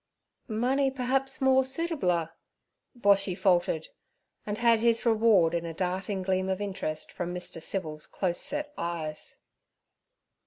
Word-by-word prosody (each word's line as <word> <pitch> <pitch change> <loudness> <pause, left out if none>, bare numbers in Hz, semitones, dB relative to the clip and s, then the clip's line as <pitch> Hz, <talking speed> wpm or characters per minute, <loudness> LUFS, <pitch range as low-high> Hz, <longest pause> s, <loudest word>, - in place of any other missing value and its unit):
'Money 255 +5 +1
perhaps 265 +1 0
more 265 0 +5
suitabler?' 265 - -1 0.7
Boshy 195 -3 +3
faltered, 175 -5 +1 0.6
and 205 0 -2
had 235 -1 +4
his 230 +1 +2
reward 215 -7 +4
in 170 -1 -1
a 165 -1 -6
darting 185 +2 -2
gleam 185 0 0
of 190 0 -1
interest 190 -6 -4
from 175 0 -4
Mr. 180 -2 -4
Civil's 155 -4 -3
close 175 -3 -1
set 295 0 -1
eyes. 160 -3 -4
195 Hz, 125 wpm, -28 LUFS, 175-245 Hz, 0.7 s, more